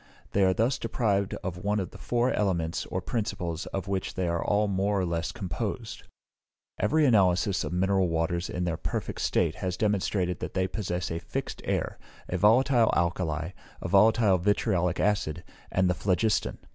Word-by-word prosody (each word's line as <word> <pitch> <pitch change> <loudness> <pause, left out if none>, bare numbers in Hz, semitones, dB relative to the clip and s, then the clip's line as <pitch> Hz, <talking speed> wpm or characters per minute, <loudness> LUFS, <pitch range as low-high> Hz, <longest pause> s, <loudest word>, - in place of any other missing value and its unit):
They 100 - +2
are 95 0 +4
thus 115 +6 +1
deprived 105 -4 0
of 90 -1 -4
one 105 +1 +1
of 90 -3 -4
the - - -12
four 120 +1 +1
elements 85 -6 -1
or - - -3
principles 95 -7 -3
of 95 0 -4
which 95 -1 -2
they 95 -1 -1
are 85 0 0
all 105 +1 +2
more 100 +1 0
or 95 - +1
less 85 -1 -2
composed. 95 -7 -4 0.8
Every 155 0 +3
analysis 100 -4 +3
of - - -4
mineral 95 0 +2
waters 85 +2 -1
in 90 - -2
their 85 -2 -1
perfect - - -4
state - - +1
has 90 -1 -3
demonstrated 95 -4 0
that - - -6
they 95 0 +1
possess 90 -4 -3
a 85 - -2
fixed - - -5
air, - - -2 0.3
a - - -3
volatile 120 +3 +4
alkali, 85 -2 -1 0.3
a - - -4
volatile 100 +1 +4
vitriolic 90 -2 +1
acid, 90 -5 0 0.3
and 95 0 +2
the 90 - +2
phlogiston. 95 +4 0
95 Hz, 170 wpm, -28 LUFS, 90-105 Hz, 0.8 s, are